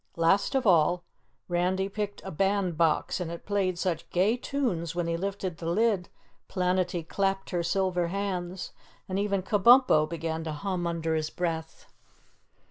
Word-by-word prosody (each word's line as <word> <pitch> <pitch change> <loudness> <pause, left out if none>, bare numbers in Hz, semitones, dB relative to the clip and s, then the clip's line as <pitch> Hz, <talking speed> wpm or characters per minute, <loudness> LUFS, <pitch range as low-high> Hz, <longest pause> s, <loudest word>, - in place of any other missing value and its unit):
Last 170 +10 +2
of 265 - +1
all, 175 -2 +4 0.4
Randy 180 +2 0
picked 205 0 -4
a 190 - -5
Band 195 0 +1
Box 160 +2 +1
and 175 -2 -3
it 170 0 -7
played 195 -3 0
such 175 -3 -2
gay 195 +6 +2
tunes 235 - -2
when 175 -1 0
he 165 0 -1
lifted 190 -1 -3
the 165 - -6
lid, 200 -1 +1 0.4
Planetty 180 -2 0
clapped 195 0 -1
her 175 -2 0
silver 180 0 0
hands, 185 -1 -3 0.3
and 190 +1 -2
even 200 -2 0
Kabumpo 205 -6 +5
began 165 0 -3
to 155 - -3
hum 180 +2 -2
under 165 -1 -1
his 155 -1 -1
breath. 165 -2 -4
180 Hz, 155 wpm, -28 LUFS, 170-195 Hz, 0.4 s, Kabumpo